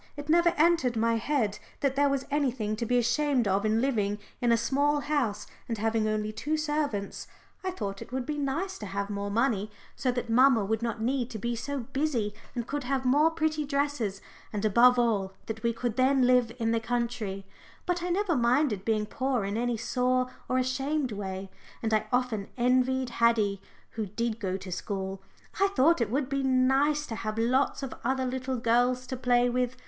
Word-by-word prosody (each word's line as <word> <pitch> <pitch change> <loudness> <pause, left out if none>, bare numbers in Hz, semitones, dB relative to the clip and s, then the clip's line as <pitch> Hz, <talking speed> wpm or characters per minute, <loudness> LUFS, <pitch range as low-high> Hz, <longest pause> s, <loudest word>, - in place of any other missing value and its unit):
It 290 +1 -7
never 345 +2 +5
entered 310 -6 +3
my 230 +1 +2
head 225 -4 0 0.2
that 275 -2 +1
there 285 0 +3
was 275 -1 -1
anything 255 -7 0
to 235 0 -2
be 245 - +2
ashamed 245 +1 +2
of 200 +2 +1
in 220 +1 +2
living 210 -6 0 0.2
in 240 -1 +3
a 230 - +5
small 285 +5 +1
house 260 -9 -1 0.2
and 230 - -1
having 220 0 +1
only 215 0 -1
two 300 +8 -2
servants. 295 -9 -2 0.4
I 375 - -1
thought 200 - -5
it - - -9
would 260 -1 -2
be 295 +1 -3
nice 305 +8 -2
to 210 - -6
have 200 +1 -3
more 200 0 -3
money, 215 -2 +1 0.3
so 255 - 0
that 245 -1 -3
mamma 235 -2 +5
would 220 +2 -1
not 230 -1 -3
need 250 0 0
to 220 - -6
be 235 +3 -2
so 280 +4 -3
busy 250 -4 -1 0.2
and 240 -2 -2
could 285 +1 -4
have 265 0 -1
more 290 +5 +5
pretty 315 -2 -1
dresses, 280 -8 -1 0.3
and 210 0 -2
above 240 +4 +6
all 210 -5 +1
that 220 0 -5
we 235 - +1
could 235 0 -3
then 260 0 +4
live 250 -2 +4
in 225 -2 0
the 230 - +2
country, 230 -4 -3 0.4
but 355 -1 0
I 355 - -2
never 365 -1 +1
minded 240 -4 +2
being 215 -1 +1
poor 255 -1 -1
in 200 +1 -3
any 240 0 0
sore 255 +2 0 0.2
or 255 - +1
ashamed 270 +2 0
way. 195 -2 -5 0.3
And 220 -1 0
I 215 0 +1
often 245 -5 0
envied 255 +1 +2
Haddie, 215 -4 +3 0.3
who 220 -2 -4
did 230 +3 -2
go 190 -3 -2
to 190 -1 -9
school. 190 +1 -4 0.4
I 395 - +5
thought 335 -5 +3
it 230 - +1
would 265 +3 0
be 275 0 -1
nice 270 +3 +2
to 230 - -6
have 215 -1 -4
lots 255 +5 +1
of 270 - -4
other 260 +1 0
little 255 0 -2
girls 245 +2 +2
to 260 - -4
play 245 -1 +3
with. 250 +1 -1
245 Hz, 200 wpm, -28 LUFS, 220-275 Hz, 0.4 s, above